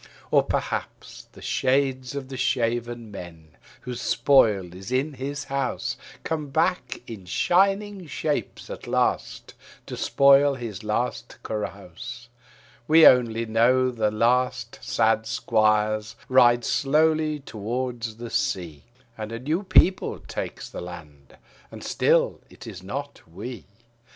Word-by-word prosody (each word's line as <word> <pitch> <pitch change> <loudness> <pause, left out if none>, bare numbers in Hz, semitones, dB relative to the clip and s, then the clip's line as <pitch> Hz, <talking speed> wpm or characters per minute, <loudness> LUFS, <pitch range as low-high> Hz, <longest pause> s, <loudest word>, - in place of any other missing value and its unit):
Or - - +6
perhaps - - -4
the - - -13
shades 130 0 0
of 135 -2 -5
the 135 - -6
shaven 120 -2 -1
men, 85 -5 -10 0.3
whose 125 -1 -6
spoil 105 -10 +3
is 95 +5 -9
in 135 +4 0
his 140 +2 -5
house, 135 0 -2 0.3
Come 155 -3 -3
back 135 - 0
in 105 -5 -9
shining 195 - +1
shapes 150 0 -3
at - - -8
last - - -1 0.3
to - - -6
spil 140 0 +4
his 110 -6 -6
last 110 +4 -2
carouse: 110 +3 -6 0.6
We 160 +1 +7
only 115 -2 +5
know 125 +3 +3
the 110 -3 0
last 125 +2 0
sad 110 -2 +1
squires 110 -1 +1
ride 120 -2 +5
slowly 155 +1 +2
towards 120 -1 -4
the 120 +1 -8
sea, 90 - -2 0.3
And 110 0 -5
a 115 - -4
new 155 +8 -1
people 190 -1 +3
takes - - -6
the - - -8
land: 75 -6 -11 0.3
and - - -10
still - - +2
it - - -13
is 90 - -8
not 140 +9 -6
we. 115 +7 -7
120 Hz, 125 wpm, -25 LUFS, 110-140 Hz, 0.6 s, We